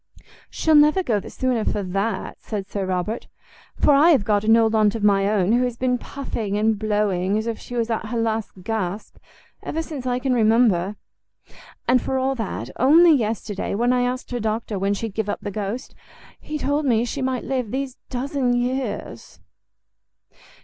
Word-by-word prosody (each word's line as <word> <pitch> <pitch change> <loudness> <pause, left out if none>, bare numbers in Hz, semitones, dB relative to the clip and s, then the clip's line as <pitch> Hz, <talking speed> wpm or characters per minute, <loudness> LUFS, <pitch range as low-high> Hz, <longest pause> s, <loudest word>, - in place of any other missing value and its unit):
"She'll 320 - +1
go 300 - +8
never 300 - +3
the - - -9
sooner 250 -4 -1
for 205 - -1
that," 195 +4 -3
said 205 -3 -5
Sir 200 -2 -3
Robert, 185 +5 -2 0.5
"for 290 - +4
I 295 +5 +6
have 275 -11 +4
got 205 -1 +2
an 225 +1 +5
old 225 -1 +3
aunt 215 -1 +3
of 220 - -4
my 200 -1 +3
own, 205 -2 +2
who 245 +2 +3
has 245 -2 -2
been 250 -1 0
puffing 225 -8 -4
and 215 0 +1
blowing 205 -2 0
as 220 - -2
if 230 -1 -3
she 245 - -8
was 235 -1 -1
at 225 -1 -2
her 235 - -3
last 220 -4 -2
gasp 210 -1 -3 0.4
ever 325 +1 -3
since 285 -6 -6
I 245 0 +1
can 255 0 0
remember; 215 -5 +3 0.9
and 250 0 +4
for 265 - -2
all 265 +1 +1
that, 190 - -5
only 320 +6 +6
yesterday, 215 -6 -2
when 240 +4 +2
I 250 - +2
asked 250 +1 -2
her 245 - -2
doctor 220 -2 -2
when 200 +1 +1
she'd 225 0 -5
give 215 0 -2
up - - -3
the 205 - -5
ghost, 210 +4 -4 0.5
he 305 - -5
told 290 +1 0
me 235 -4 +2
she 270 +3 -4
might 260 -1 -1
live 255 -5 -2
these 265 +1 -4
dozen 260 0 -1
years." 250 +2 -3
225 Hz, 190 wpm, -22 LUFS, 210-255 Hz, 0.9 s, go